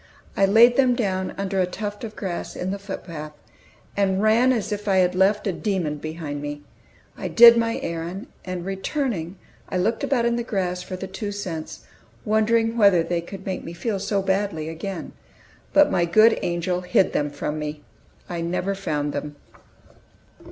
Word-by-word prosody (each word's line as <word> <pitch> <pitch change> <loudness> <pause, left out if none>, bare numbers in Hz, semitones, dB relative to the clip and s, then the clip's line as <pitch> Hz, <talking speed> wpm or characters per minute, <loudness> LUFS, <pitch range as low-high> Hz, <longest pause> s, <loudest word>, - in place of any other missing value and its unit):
I 195 - +4
laid 235 +4 +6
them 255 -2 +4
down 190 -5 -1
under 195 -1 0
a 180 - +1
tuft 205 +3 -5
of 220 -2 -6
grass 185 -4 -4
in 185 +1 -3
the 200 - -4
footpath, 165 -6 -7 0.6
and 195 -1 +1
ran 225 +5 +4
as 225 -5 -1
if 210 0 -4
I 195 - +3
had 180 -1 +3
left 195 +3 +2
a 200 - +1
demon 175 -7 -2
behind 155 -1 -5
me. 145 0 -6 0.5
I - - -4
did 235 0 +9
my 230 0 0
errand, 170 +6 -4 0.2
and 180 -1 -5
returning, 195 - -2 0.3
I - - -1
looked 220 +6 0
about 245 -4 +1
in 235 0 +1
the 235 - -1
grass 180 -5 -2
for 185 - -6
the 185 - -5
two 205 +2 -5
cents, 165 - -6 0.4
wondering 225 +2 +2
whether 200 -6 +5
they 170 0 -1
could 190 +2 -10
make 190 -1 -3
me 165 - -7
feel 200 +3 -2
so 195 0 -1
badly 190 -5 -1
again. 185 +4 -6 0.6
But 295 0 +5
my 175 - +2
good 215 +7 +5
angel 175 +1 -1
hid 180 +1 +2
them 145 0 0
from 150 +1 -4
me; 150 0 -5 0.4
I 170 -1 -4
never 180 +3 -1
found 150 -7 -2
them. 145 0 -5
190 Hz, 180 wpm, -23 LUFS, 170-210 Hz, 0.6 s, did